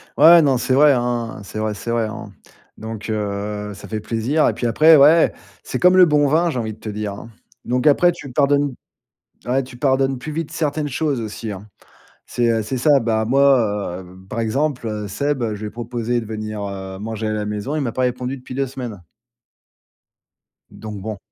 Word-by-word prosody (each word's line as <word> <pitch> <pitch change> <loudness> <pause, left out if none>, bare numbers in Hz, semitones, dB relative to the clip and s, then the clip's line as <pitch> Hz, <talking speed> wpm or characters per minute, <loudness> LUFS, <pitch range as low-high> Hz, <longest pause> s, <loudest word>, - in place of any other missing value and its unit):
Ouais, 165 +3 +8
non, 140 -4 +3
c'est 130 - 0
vrai, 145 +2 +6
hein. 120 -3 -2
C'est 105 +2 -7
vrai, 110 0 -1
c'est 115 +3 -5
vrai, 115 -1 +1
hein. 110 - -8 0.5
Donc, 110 -1 -7
heu, 105 0 -3
ça 100 - -11
fait 110 - -3
plaisir 115 +8 0
et - - +1
puis 120 - -2
après 155 +7 +6
ouais, 155 +4 +6 0.3
c'est - - -4
comme 180 +1 +5
le 185 - +9
bon 150 -3 +3
vin, 165 +4 +2
j'ai 130 - -3
envie 110 -2 -3
de 110 - -17
te 110 - -7
dire 105 -1 -4
hein. 105 +3 -10 0.4
Donc 125 +3 0
après 175 +4 +5
tu 150 -6 -10
pardonnes 140 0 +2 0.7
ouais 130 +2 +1
tu 125 -1 -12
pardonnes 135 0 +1
plus 155 +4 -6
vite 160 -1 -4
certaines 150 -1 -2
choses 140 -2 -1
aussi, 110 0 -5
hein. 100 +2 -10 0.6
C'est, 120 -1 0
heu, 115 -1 +1
c'est 110 +5 -4
ça. 140 +2 +4
Bah 110 -2 0
moi, 115 -8 +2
heu, 90 0 -15
par 115 - -3
exemple, 130 +3 -1
heu, 105 -2 -4
Seb, 140 +6 -1
je 105 - -9
lui 110 - -4
ai - - -5
proposé 120 +1 -3
de 115 - -8
venir, 110 -1 -5
heu, 95 -1 -6
manger 110 +1 -4
à - - -1
la 105 -1 -2
maison, 105 +7 -3
il - - -1
m'a 120 -4 -2
pas 130 - -2
répondu 125 +1 -2
depuis 130 -1 -10
2 135 +1 -1
semaines 120 -7 -7 1.7
donc, 105 -2 -8
bon. 110 +1 -5
120 Hz, 210 wpm, -20 LUFS, 110-140 Hz, 1.7 s, le